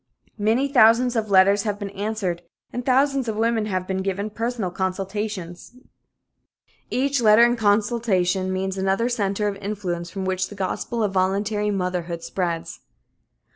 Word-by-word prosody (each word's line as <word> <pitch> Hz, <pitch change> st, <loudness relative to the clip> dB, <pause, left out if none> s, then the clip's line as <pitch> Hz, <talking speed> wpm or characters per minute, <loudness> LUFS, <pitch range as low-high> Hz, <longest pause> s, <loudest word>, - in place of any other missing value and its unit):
Many 225 Hz, +7 st, +2 dB
thousands 245 Hz, -1 st, +5 dB
of 220 Hz, -2 st, -1 dB
letters 200 Hz, +1 st, +5 dB
have 205 Hz, -1 st, -2 dB
been 200 Hz, -1 st, -6 dB
answered 200 Hz, -4 st, -3 dB, 0.3 s
and 245 Hz, -, -3 dB
thousands 270 Hz, 0 st, +2 dB
of 220 Hz, -, -2 dB
women 225 Hz, -1 st, +1 dB
have 185 Hz, -3 st, -2 dB
been 190 Hz, 0 st, -2 dB
given 200 Hz, +2 st, -3 dB
personal 225 Hz, -3 st, -3 dB
consultations. 190 Hz, 0 st, -4 dB, 1.2 s
Each 275 Hz, 0 st, 0 dB
letter 215 Hz, +1 st, +6 dB
and 240 Hz, 0 st, +4 dB
each 240 Hz, -, -5 dB
consultation 205 Hz, -3 st, +1 dB
means 190 Hz, 0 st, -2 dB
another 195 Hz, +5 st, +1 dB
center 210 Hz, -3 st, -1 dB
of 200 Hz, -1 st, -3 dB
influence 190 Hz, -4 st, -4 dB
from 190 Hz, +1 st, -5 dB
which 185 Hz, 0 st, -1 dB
the 205 Hz, -, -10 dB
gospel 205 Hz, +4 st, -2 dB
of 200 Hz, -2 st, -1 dB
voluntary 205 Hz, +3 st, 0 dB
motherhood 180 Hz, -3 st, -2 dB
spreads. 170 Hz, -3 st, -3 dB
205 Hz, 150 wpm, -23 LUFS, 190-225 Hz, 1.2 s, letter